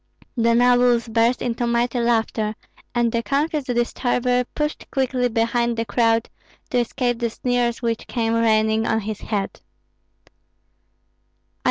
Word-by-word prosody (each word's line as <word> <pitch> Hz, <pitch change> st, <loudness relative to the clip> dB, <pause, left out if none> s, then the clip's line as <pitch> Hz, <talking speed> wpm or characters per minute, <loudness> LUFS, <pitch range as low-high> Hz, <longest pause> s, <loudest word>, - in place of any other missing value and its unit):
The 230 Hz, -1 st, +3 dB
nobles 245 Hz, -1 st, +4 dB
burst 230 Hz, +2 st, +1 dB
into 240 Hz, 0 st, -1 dB
mighty 235 Hz, +1 st, 0 dB
laughter, 225 Hz, -2 st, 0 dB, 0.4 s
and 240 Hz, -1 st, +2 dB
the 230 Hz, -, 0 dB
confused 290 Hz, +2 st, -1 dB
disturber 245 Hz, 0 st, 0 dB
pushed 300 Hz, 0 st, -3 dB
quickly 255 Hz, -2 st, 0 dB
behind 235 Hz, +1 st, 0 dB
the 230 Hz, -, -1 dB
crowd, 225 Hz, +1 st, +2 dB, 0.4 s
to 250 Hz, -, +2 dB
escape 245 Hz, 0 st, -1 dB
the 235 Hz, -1 st, 0 dB
sneers 245 Hz, +1 st, -1 dB
which 230 Hz, -1 st, -2 dB
came 225 Hz, -2 st, -1 dB
raining 220 Hz, -1 st, +2 dB
on 220 Hz, 0 st, +1 dB
his 215 Hz, 0 st, -5 dB
head. 205 Hz, -3 st, -3 dB
235 Hz, 130 wpm, -22 LUFS, 225-245 Hz, 0.4 s, nobles